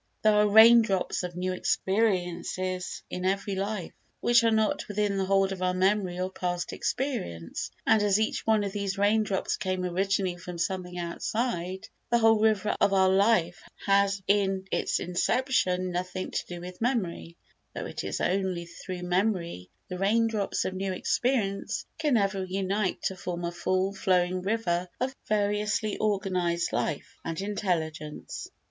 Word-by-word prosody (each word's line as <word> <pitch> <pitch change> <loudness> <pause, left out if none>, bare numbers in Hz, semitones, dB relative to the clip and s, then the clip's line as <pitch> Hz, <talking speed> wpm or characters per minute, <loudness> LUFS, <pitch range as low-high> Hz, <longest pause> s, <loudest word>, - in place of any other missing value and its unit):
There 215 0 +5
are 210 0 +4
rain 225 +3 +9
drops 195 -5 -1
of 180 -1 -5
new 185 +1 -1
experiences 185 -2 -1
in 180 - -4
every 195 +2 0
life 195 -1 -3 0.3
which 240 -1 +4
are 230 - +4
not 220 -1 +1
within 205 -1 0
the 195 -1 0
hold 195 0 +2
of 190 -1 -5
our 180 0 +1
memory 185 -1 +1
or 185 +1 -2
past 175 -2 -3
experience, 210 - -3 0.2
and, 220 - +4
as 205 0 +3
each 220 - -1
one 220 -2 +4
of 200 - -2
these 200 -1 -3
rain 205 +2 +3
drops 200 -3 -1
came 185 -2 -2
originally 185 0 0
from 180 0 -8
something 180 +1 -3
outside, 185 +1 -3 0.2
the 235 - +4
whole 225 -1 +5
river 215 -2 +2
of 200 - +4
our 190 -1 +4
life 190 -1 +3 0.2
has 200 0 +3
in 195 -1 +2
its - - 0
inception 185 -1 +1
nothing 180 +1 -3
to - - -2
do 175 -1 -6
with 180 +2 -9
memory, 190 -8 -2 0.4
though - - -4
it - - -5
is - - -3
only 185 -2 0
through 180 +1 -7
memory 180 - -1 0.2
that - - -7
the 180 - -5
rain 225 +4 +3
drops 215 -3 -1
of 185 - -2
new 190 +1 -2
experience 205 -1 -1
can 300 -6 +3
ever 195 -2 0
unite 190 +1 -1
to 190 - -1
form 175 -1 -4
a 170 - -2
full 185 +3 0
flowing 185 -1 +1
river 185 -3 -1
of 260 +2 -2
variously 210 0 0
organised 185 -5 0
life - - -3
and 165 -1 -4
intelligence. 160 -7 -3
190 Hz, 165 wpm, -28 LUFS, 180-210 Hz, 0.4 s, rain